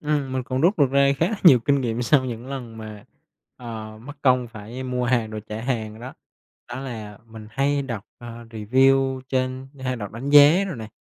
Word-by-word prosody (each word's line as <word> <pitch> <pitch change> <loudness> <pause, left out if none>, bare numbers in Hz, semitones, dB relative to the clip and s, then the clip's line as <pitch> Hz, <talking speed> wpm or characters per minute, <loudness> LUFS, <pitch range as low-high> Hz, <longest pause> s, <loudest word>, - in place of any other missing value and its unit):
Ừm, 145 -3 -1
mình 130 -1 -1
còn 130 +1 -3
rút 175 +3 +3
được 140 -3 +4
ra 140 0 +4
khá 165 - +2
là 220 - -2
nhiều 135 -8 +9
kinh 140 +3 +1
nghiệm 120 -1 -2
sau 130 +2 +3
những 120 0 -6
lần 125 -5 -7
mà, 110 -1 -9 0.5
ờ, 110 -3 -8
mất 145 +3 -8
công 125 -3 +3
phải 115 +3 -8
mua 125 -1 -2
hàng 120 -3 +1
rồi 110 0 -5
trả 110 +1 -5
hàng 110 -3 -3
đó. 125 +2 -8 0.5
Đó 120 +2 -6
là 110 -6 -7
mình 110 -1 -11
hay 140 +4 0
đọc, 115 -6 -5
à, 120 0 -10
review 130 +4 +2
trên 130 0 -2
hay 130 -1 -2
đọc 105 -2 -7
đánh 130 +5 -5
giá 150 +6 +7
rồi 180 -9 -5
nè. 110 -2 -7
125 Hz, 210 wpm, -23 LUFS, 115-135 Hz, 0.5 s, nhiều